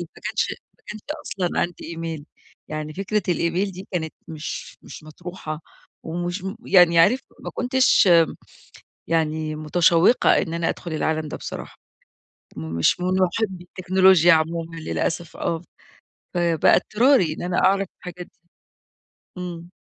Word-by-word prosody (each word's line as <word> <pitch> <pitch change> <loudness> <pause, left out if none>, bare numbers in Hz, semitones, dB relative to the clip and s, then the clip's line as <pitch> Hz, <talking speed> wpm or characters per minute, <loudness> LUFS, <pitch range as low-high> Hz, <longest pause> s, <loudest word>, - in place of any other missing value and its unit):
ما - - -15
كانش - - -1 0.2
ما - - -33
كانش 215 0 -7 0.2
أصلًا 180 -3 -2
عندي 175 0 -3
إيميل 165 -3 -5 0.4
يعني 155 0 -5
فكرة 200 +2 -1
الإيميل 175 +3 0
دي 190 +2 -10
كانت 160 -3 -2
مش 155 -1 -7
مش - - -11
مطروحة 155 0 -7 0.4
ومشم 175 +4 -4
يعني 175 -3 +6
عارف 225 +10 +5 0.2
ما - - -6
كنتش 255 -6 +3 1.0
يعني 155 -1 0
متشوّقة 170 +7 +4
إن 165 -3 -4
أنا 170 -1 0
أدخل 170 -2 -5
العالم 155 0 -1
ده - - -5
بصراحة. - - -8 0.8
مش 80 - 0
من 180 - -1
مُحبّي 185 0 0
التكنولوجيا 185 -1 +4
عمومًا 165 +1 -1
للأسف 165 +1 -3
آه، 165 -1 -2 0.7
فبقى 170 -2 +3
اضطراري 225 - +3
إن - - -8
أنا 180 0 -1
أعرف 195 0 +3
الحاجات 180 0 -8
دي. 170 0 -33 0.9
إمم. 175 -1 -7
170 Hz, 130 wpm, -23 LUFS, 160-185 Hz, 1.0 s, يعني